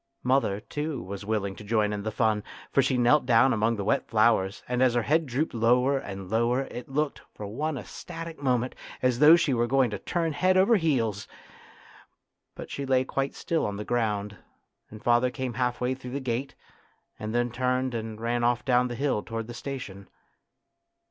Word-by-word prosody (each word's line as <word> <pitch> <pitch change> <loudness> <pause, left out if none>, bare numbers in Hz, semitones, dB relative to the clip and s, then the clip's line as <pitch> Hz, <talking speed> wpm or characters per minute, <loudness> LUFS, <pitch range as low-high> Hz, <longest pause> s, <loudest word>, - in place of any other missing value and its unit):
Mother, 125 -6 +2
too, 150 +5 -4
was 100 +2 -7
willing 100 -3 -1
to - - -10
join 105 -1 +1
in 105 - -3
the 110 - -2
fun, 110 -1 +1 0.3
for 140 - +4
she 130 -1 +1
knelt 125 +3 +4
down 125 +2 +5
among 115 +1 +1
the 100 - -3
wet 100 - 0
flowers, 110 -4 +2
and 125 0 -1
as 125 -2 +4
her 120 - +2
head 155 +5 +2
drooped 135 +6 -1
lower 125 +4 +3
and 95 -5 -7
lower 115 +5 +1
it 125 -1 -8
looked, 145 +1 -1
for 105 - -7
one 145 +9 -3
ecstatic 165 +3 -8
moment, 125 -2 0 0.3
as 125 -2 +2
though 150 +3 +9
she 155 -5 +1
were 120 -1 +1
going 130 -2 +2
to 105 - -4
turn 165 -2 -1
head 185 +4 +2
over 195 +5 +5
heels. 115 - 0 1.3
But - - -9
she 140 - -4
lay 130 -1 +3
quite 135 +1 -2
still 165 -1 -1
on 100 -1 -2
the 105 - -5
ground, 105 -4 -1 0.5
and 105 0 -12
father 120 +1 +3
came 125 0 -4
half 125 0 -1
way 125 +1 0
through 130 -1 -8
the 140 - -1
gate, 130 +1 -3 0.6
and 110 0 -4
then 120 0 +1
turned 125 +1 0
and 110 -1 -5
ran 120 +1 -1
off 120 0 +1
down 125 -1 +3
the 120 - -5
hill 135 -4 0
towards 115 0 -5
the - - -6
station. 120 -6 -7
120 Hz, 195 wpm, -27 LUFS, 110-135 Hz, 1.3 s, though